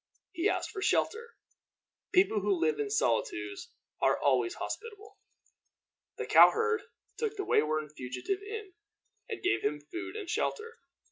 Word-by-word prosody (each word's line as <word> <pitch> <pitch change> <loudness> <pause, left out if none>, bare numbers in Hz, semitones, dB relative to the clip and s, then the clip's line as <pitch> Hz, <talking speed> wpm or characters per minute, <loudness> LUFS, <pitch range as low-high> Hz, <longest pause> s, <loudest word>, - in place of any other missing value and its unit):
He 370 +2 +1
asked - - -1
for 390 - -6
shelter. 465 +4 0 0.8
People 365 - +4
who 195 -2 +1
live 155 -2 +1
in 145 -1 -1
solitudes 105 -6 -1 0.3
are - - +4
always 125 -4 +2
hospitable. 425 -1 -7 1.0
The - - -3
cow - - +8
herd 450 -1 0 0.4
took 445 -2 -2
the 395 - -2
wayworn 155 0 +2
fugitive 150 - -4
in, 415 -2 -7 0.6
and 435 - -5
gave 360 - +2
him 150 +1 -1
food 355 - -7
and 425 -4 -5
shelter. 455 +2 -2
365 Hz, 140 wpm, -31 LUFS, -, 1.0 s, cow